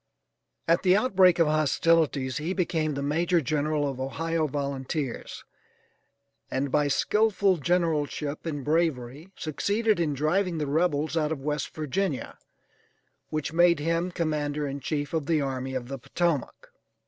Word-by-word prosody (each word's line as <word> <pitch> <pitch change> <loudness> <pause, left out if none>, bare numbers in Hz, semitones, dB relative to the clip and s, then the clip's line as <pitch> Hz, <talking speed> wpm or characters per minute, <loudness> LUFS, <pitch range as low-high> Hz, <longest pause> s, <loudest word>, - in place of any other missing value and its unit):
At 165 +1 +3
the 185 0 +4
outbreak 190 -6 +4
of 165 - +4
hostilities 155 -2 +2
he 160 +4 -2
became 165 -5 0
the 140 - -3
major 170 +5 +2
general 150 +1 0
of 135 -2 -4
Ohio 160 +4 -1
volunteers, 140 0 -4 1.1
and 135 +1 -2
by 150 +1 +2
skillful 200 +4 +2
generalship 155 -2 -1
and 145 -4 -4
bravery, 150 -1 -1
succeeded 205 +7 0
in 155 -4 0
driving 170 +5 +1
the 150 - -1
rebels 155 0 0
out 155 -1 +1
of 140 -4 -4
West 150 -1 -3
Virginia, 155 0 -2 0.9
which 155 0 -3
made 175 0 +5
him 165 +4 0
commander 150 -4 -2
in 140 0 -4
chief 145 +1 -3
of 155 -3 -1
the 160 -2 +2
Army 130 -1 -3
of 125 -2 -3
the 135 +1 -6
Potomac. 165 0 -2
155 Hz, 140 wpm, -27 LUFS, 140-170 Hz, 1.1 s, made